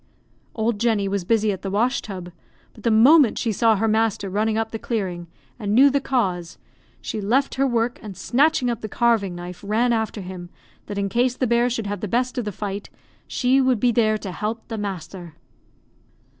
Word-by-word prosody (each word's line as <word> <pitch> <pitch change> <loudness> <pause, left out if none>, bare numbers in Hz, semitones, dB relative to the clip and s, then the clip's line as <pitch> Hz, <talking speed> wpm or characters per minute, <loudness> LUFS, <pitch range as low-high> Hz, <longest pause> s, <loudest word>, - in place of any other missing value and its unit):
Old 220 -1 -1
Jenny 220 -3 +1
was 195 -1 -1
busy 215 +2 +2
at 190 - -5
the 195 - -4
wash 235 +7 +1
tub, 185 -4 -8 0.4
but 215 - -15
the - - +2
moment 245 +4 +6
she 230 - 0
saw 220 +2 +3
her 220 +3 0
master 220 -3 0
running 215 +2 0
up 225 0 -1
the 225 - -5
clearing, 185 -8 -3 0.3
and 210 -1 -1
knew 275 +3 +7
the 280 +1 +1
cause, 185 -11 -1 0.4
she 215 - -4
left 250 +8 +1
her 275 +1 +1
work, 240 0 0
and 205 -4 -9
snatching 275 0 +2
up 235 -2 -2
the 215 - -5
carving 220 -5 +1
knife, 175 +1 -8
ran 225 +4 +1
after 220 -2 -2
him, 180 -1 -8 0.4
that 205 - -5
in 200 0 0
case 240 +5 +1
the 255 - +1
bear 235 +1 +2
should 230 -3 -3
have 205 0 -3
the 210 - -4
best 250 +5 0
of 240 - -3
the 210 - -3
fight, 200 +1 -5 0.4
she 260 +2 +2
would 255 -3 +2
be 245 +2 +3
there 215 -2 +2
to 200 -3 -6
help 220 +5 -4
"the 225 - -4
masther." 180 -4 -6
220 Hz, 205 wpm, -23 LUFS, 200-240 Hz, 0.4 s, knew